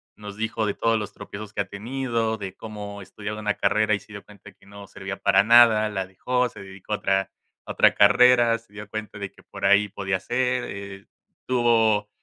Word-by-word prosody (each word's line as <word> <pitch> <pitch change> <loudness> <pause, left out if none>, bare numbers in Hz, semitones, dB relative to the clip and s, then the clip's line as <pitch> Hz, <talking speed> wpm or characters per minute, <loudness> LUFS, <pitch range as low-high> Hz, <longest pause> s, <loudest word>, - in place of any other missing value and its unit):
nos 105 -1 -10
dijo 110 0 -2
de 100 - -2
todos 115 -1 +1
los 105 -1 -6
tropiezos 105 0 -9
que - - -1
ha - - -3
tenido, 115 0 -2
de 95 -2 -7
cómo 105 -2 -8
estudiaba 105 +2 -7
una 105 -1 -1
carrera 110 0 +2
y - - -5
se 105 - -16
dio 100 - -9
cuenta 100 -1 -15
que 95 - -25
no 100 0 -11
servía 95 0 -7
para 100 -1 +4
nada, 115 -1 +6
la 95 -2 -3
dejó, 125 +7 -1
se - - -14
dedicó 95 +1 -8
a - - +3
otra 95 0 0 0.3
a - - -6
otra - - +4
carrera, 120 +2 +5
se 115 -2 -27
dio 105 0 -9
cuenta 110 0 -6
de 100 -1 -6
que - - -20
por - - -7
ahí 100 +1 +4
podía 95 -1 -2
ser, 125 +2 -1
eh, 100 -1 -9 0.4
tuvo 115 -4 +2
105 Hz, 210 wpm, -24 LUFS, 100-115 Hz, 0.4 s, nada